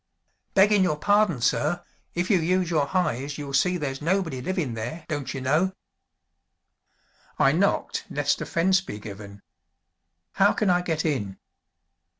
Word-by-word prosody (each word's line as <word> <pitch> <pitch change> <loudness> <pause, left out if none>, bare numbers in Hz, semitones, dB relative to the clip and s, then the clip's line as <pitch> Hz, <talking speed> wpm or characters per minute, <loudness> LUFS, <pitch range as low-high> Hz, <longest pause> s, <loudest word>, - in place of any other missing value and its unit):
"Beggin' 205 +1 +5
your 175 -5 +1
pardon, 205 - +2
sir, 155 +8 +1 0.3
if 175 +4 0
you 190 - +4
use 180 +1 +1
your 150 -4 +2
heyes 140 -6 -1
you'll 145 -2 -6
see 180 +6 +2
there's 135 -4 -4
nobody 165 -5 0
livin' 170 -5 -2
there, 120 +9 -6
don't 145 -5 -3
you 135 - -5
know!" 155 +9 +1 1.6
"I - - +4
knocked - - 0
lest - - 0
offense 190 +3 +2
be 105 - -7
given. 100 -1 -10 0.9
How 200 +1 +3
can 210 -4 +1
I 180 0 +3
get 165 -2 -2
in?" 105 -11 -2
160 Hz, 145 wpm, -25 LUFS, 135-185 Hz, 1.6 s, Beggin